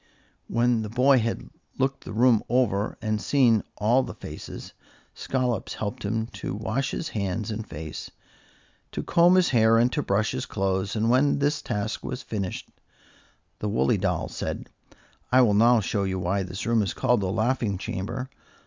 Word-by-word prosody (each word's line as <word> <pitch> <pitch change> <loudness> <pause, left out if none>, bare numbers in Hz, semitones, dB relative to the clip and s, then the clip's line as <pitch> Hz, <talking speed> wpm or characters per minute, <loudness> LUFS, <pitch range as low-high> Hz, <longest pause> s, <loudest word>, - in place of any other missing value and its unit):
When 120 -1 +2
the 105 - -4
boy 130 +4 +4
had 115 0 -3 0.3
looked 135 +1 -1
the - - -7
room 115 0 +4
over 110 -5 +1
and 110 -1 -1
seen 120 -6 +3 0.2
all 115 +5 +3
the - - -6
faces, - - -9 0.4
Scollops 125 -5 -2
helped 105 -1 -4
him 110 +2 -1 0.2
to 95 - -3
wash 115 +6 -2
his 165 - -4
hands 105 +1 -2
and 110 0 -5
face, 75 +1 -7 0.8
to - - -3
comb 175 +2 +5
his 185 -1 +4
hair 115 -2 +4
and 120 +2 +3
to 150 - 0
brush 105 -3 +1
his - - -4
clothes, 95 0 -1
and 110 +2 +2
when 135 +3 +3
this 145 +1 0
task 105 +2 -3
was 130 0 -5
finished, 100 -4 -4 0.9
the 105 - -2
woolly 65 -8 +2
doll - - -1
said: - - -5 0.6
"I 130 +1 +6
will 105 -4 +3
now 115 +2 +5
show 100 0 -1
you 95 -1 -1
why 95 +2 0
this 95 +1 -5
room 115 -1 +3
is 100 - -2
called 125 -4 +2
the 95 -1 -1
laughing 110 -1 0
chamber. 120 +8 -4
110 Hz, 175 wpm, -26 LUFS, 100-125 Hz, 0.9 s, I